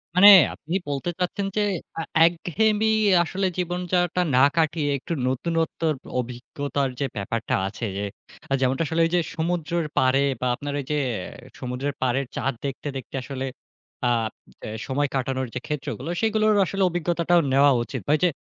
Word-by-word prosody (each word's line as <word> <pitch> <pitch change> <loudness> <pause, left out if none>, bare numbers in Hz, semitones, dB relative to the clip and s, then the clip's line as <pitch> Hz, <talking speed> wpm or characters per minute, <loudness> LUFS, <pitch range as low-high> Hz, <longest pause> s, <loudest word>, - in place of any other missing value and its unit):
মানে, 200 +3 +9 0.2
আপনি 160 +4 -8
বলতে 145 +5 -2
চাচ্ছেন, 185 +2 -1
যে - - +3 0.3
অ্যা 165 - -3 0.2
একঘেয়েমি 210 +6 +1 0.4
আসলে 190 +3 -2
জীবনযাপনটা 180 0 0
না 130 - +5 0.2
কাটিয়ে, 155 -2 +1
একটু 140 - -5
নতুনত্বর 160 +3 0 0.3
অভিজ্ঞতার 135 +3 -3
যে 140 - +1
ব্যাপারটা 110 +3 -1
আছে 110 +3 -5
যে, 100 - -2 0.6
যেমনটা 130 +4 +2
আসলে 165 +2 +1
ওই 165 - -1
যে - - +4 0.2
সমুদ্রের 170 0 -1
পাড়ে 130 +1 +4 0.2
বা 125 - +1
আপনার 145 +2 -5
ওই 140 - -5
যে 150 - +1 0.6
সমুদ্রের 130 +3 -3
পাড়ের 130 +2 +1
চাঁদ 135 - -1
দেখতে, 140 +2 -4
দেখতে 130 +1 -8
আসলে 135 0 -4 0.6
আ - - +3 0.5
অ্যা - - -6 0.2
সময় 145 +2 0
কাটানোর 130 0 -1
যে - - -1
ক্ষেত্রগুলো। 150 0 -4
সেগুলোর 215 -1 +3
আসলে 195 +2 -1
অভিজ্ঞতাটাও 175 0 +2
নেওয়া 140 +1 +6
উচিত। 115 - -6
ঐযে 165 +4 +3
150 Hz, 150 wpm, -24 LUFS, 135-175 Hz, 0.6 s, মানে